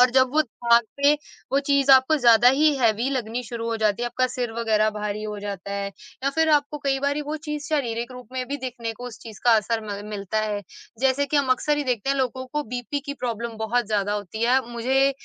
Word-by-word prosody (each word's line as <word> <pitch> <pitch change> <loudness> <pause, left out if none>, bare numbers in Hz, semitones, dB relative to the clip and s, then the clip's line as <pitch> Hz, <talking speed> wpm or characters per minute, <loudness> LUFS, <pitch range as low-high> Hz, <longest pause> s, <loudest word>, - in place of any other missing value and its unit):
और 250 0 +6
जब 260 0 +4
वो 310 - +4
थाक 235 -2 +3 0.2
के 285 +1 +6 0.4
वो 275 - +4
चीज़ 280 -1 +3
आपको 265 +4 +6
ज़्यादा 240 -2 +6
ही 305 +1 +4
हैवी 230 -1 +2
लगनी 245 -2 -2
शुरू 230 -1 -5
हो 230 - -1
जाती 215 +1 +1
है, - - 0
आपका 255 +1 0
सिर 245 -1 -3
वग़ैरह 220 -2 +1
भारी 210 0 -4
हो 210 -1 -5
जाता 200 -1 -5
है। 200 0 -2 0.4
या 275 - +2
फिर 320 +2 +1
आपको 295 0 +2
कई 275 -1 0
बारी 285 +1 0
वो 310 - -2
चीज़ 300 -1 -4
शारीरिक 240 -5 -1
रूप 250 0 -10
में 255 -1 -2
भी 285 - -2
दिखने 245 -3 -5
को 245 +3 -9
उस 225 -2 -9
चीज़ 220 -3 -11
का 240 - +6
असर 225 +1 0
म 205 -1 -5
मिलता 205 0 -3
है, 210 -1 -2 0.4
जैसे 270 +2 +2
कि 290 +2 0
हम 280 -2 +2
अक्सर 295 +4 0
ही 295 - -1
देखते 250 -1 -1
हैं 275 - +1
लोगों 260 -1 -1
को 300 0 0
बीपी 250 +4 -4
की 280 - -3
प्रॉब्लम 235 -3 -4
बहुत 230 +1 0
ज़्यादा 205 -1 0
होती 210 +1 -4
है। 245 +2 +4
अ, 265 - -3
मुझे 260 +4 +2
245 Hz, 240 wpm, -24 LUFS, 220-275 Hz, 0.4 s, और